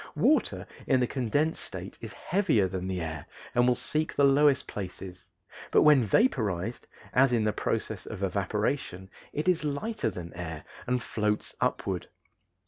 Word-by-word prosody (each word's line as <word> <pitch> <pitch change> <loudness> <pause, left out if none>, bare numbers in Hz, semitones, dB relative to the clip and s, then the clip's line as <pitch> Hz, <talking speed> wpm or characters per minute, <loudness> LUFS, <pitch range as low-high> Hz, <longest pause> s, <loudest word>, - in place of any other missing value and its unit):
Water - - +2 0.2
in 130 - +4
the 125 - +3
condensed 140 +6 0
state - - -8
is - - -7
heavier 165 - +1
than 95 0 -4
the 95 -2 -2
air 80 -2 -5 0.3
and 120 0 +4
will 125 - +4
seek 155 +5 +1
the 145 - +3
lowest 140 0 +5
places, 90 -2 -7 0.4
but - - +5
when 150 -4 +6
vaporized, 110 - +1 0.3
as 135 0 +5
in 115 -3 +2
the 105 -1 +1
process - - -3
of 95 - -6
evaporation, 100 0 -2 0.2
it 150 +4 -3
is 180 -3 +3
lighter 150 - -1
than 90 -4 -8
air 80 -3 -6 0.2
and 125 -1 0
floats 105 -1 -1
upward. - - -1
115 Hz, 155 wpm, -28 LUFS, 95-145 Hz, 0.4 s, when